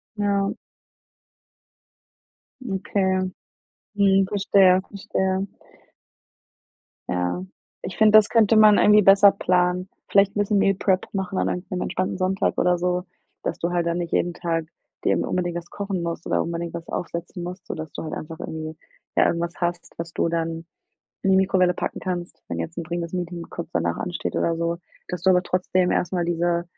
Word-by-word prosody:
Ja. 200 -1 +1 2.1
Okay. 190 -2 0 0.6
Mhm. 195 -1 +4
Verstehe, 195 -2 +4
verstehe. 190 -1 -1 1.6
Ja. 90 - -1 0.4
Ich 180 - -6
find, 215 -1 +5
das 215 -1 +7
könnte 225 -1 +4
man 215 -1 +7
irgendwie 210 0 +6
besser 195 +1 +7
planen. 180 0 +1 0.2
Vielleicht 200 +1 +4
'n - - -1
bisschen 205 0 +2
Meal 195 0 +4
Prep 190 0 +1
machen 190 -1 -2
an - - +1
einem 180 +1 -3
am 180 -1 -3
entspannten 185 0 -2
Sonntag 185 +1 0
oder 180 0 +3
so, 180 +1 0 0.4
dass - - -3
du 170 - 0
halt 175 -1 0
dann 170 0 0
nicht 170 -1 -4
jeden 175 0 +1
Tag 165 -2 -2 0.4
dir - - +4
immer - - -1
unbedingt 175 -1 -1
was 175 0 -8
kochen 200 -3 -3
musst 170 0 -4
oder - - +1
unbedingt 170 0 -4
was 170 -1 -7
aufsetzen 170 +1 -5
musst, 180 +1 -7
sodass 160 -2 -6
du - - -5
halt 155 - -5
einfach 160 +1 -7
irgendwie 160 0 -6 0.4
äh, - - +5
irgendwas 170 0 0
hast, 175 0 -3
was 165 0 -5
du - - +1
dann 165 0 -2 0.6
in 195 - +2
die - - +5
Mikrowelle 185 -1 +3
packen - - -4
kannst, 180 -2 -5
wenn 85 - -4
jetzt 85 - -5
'n 170 - -3
dringendes 170 0 -4
Meeting 175 -1 -4
kurz 170 - -6
danach 85 -1 0
ansteht 175 -1 -4
oder 165 - +1
so. 170 0 -1 0.3
Dass 180 -2 -5
du 190 - +5
aber 180 -1 +4
trotzdem 180 0 +1
erst 180 - 0
mal 175 -2 0
diese 170 0 0
180 Hz, 175 wpm, -24 LUFS, 170-195 Hz, 2.1 s, das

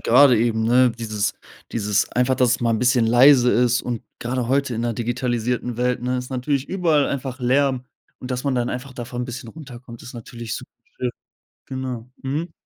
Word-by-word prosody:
gerade 125 0 +6
eben, 110 -1 +1
ne, 125 +2 +5
dieses 110 -3 -2 0.4
dieses 105 -2 0
einfach, 125 +1 +2
dass 125 -2 +3
es 125 - -1
mal 120 -1 +1
'n 110 - +1
bisschen 125 0 +3
leise 125 +1 +6
ist 125 0 +2
und 120 -2 -4 0.2
gerade 120 0 -2
heute 135 -1 +1
in 115 - -2
'ner 120 -1 -1
digitalisierten 120 0 -2
Welt, 125 0 0
ne, 125 +1 0
ist 125 +1 -5
natürlich 130 +2 -1
überall 165 -6 +2
einfach 135 -1 -4
Lärm 130 0 +1 0.3
und 125 - -8
dass 125 +1 -3
man 140 -2 +1
dann 120 -1 0
einfach 130 +1 -6
davon 120 0 -5
'n - - -2
bisschen 120 -2 -7
runterkommt, 125 -6 -11
ist 125 - -10
natürlich 115 -1 -7
super - - -11 0.3
schön. - - -1 0.6
Genau, 130 -3 -5
mhm. 150 +6 -3
125 Hz, 195 wpm, -22 LUFS, 120-130 Hz, 0.6 s, gerade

